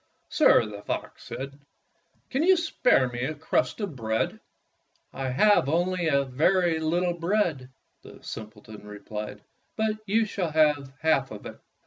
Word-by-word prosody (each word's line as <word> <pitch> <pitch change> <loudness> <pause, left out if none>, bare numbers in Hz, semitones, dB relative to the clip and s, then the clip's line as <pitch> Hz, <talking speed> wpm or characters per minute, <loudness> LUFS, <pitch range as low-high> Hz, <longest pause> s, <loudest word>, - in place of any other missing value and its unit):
"Sir," - - +5
the 105 -1 -8
fox - - -5
said, 140 +1 -7 0.7
"can 270 - 0
you 370 +3 +5
spare 285 - +2
me 120 0 -4
a 155 - -3
crust 160 +8 -1
of 195 -8 -4
bread?" 110 -2 -1 0.7
"I 135 -1 -3
have 140 +2 +4
only 175 +2 +1
a 140 -3 +3
very 165 +5 +2
little 175 +3 0
bread," 170 -7 -1 0.3
the - - -13
simpleton 105 -1 -9
replied, 105 +1 -7 0.3
"but 220 -1 -1
you 220 +3 +3
shall 185 -4 -2
have 150 -3 +2
half 155 -5 +2
of 105 - -10
it." - - -9
155 Hz, 145 wpm, -26 LUFS, 125-185 Hz, 0.7 s, Sir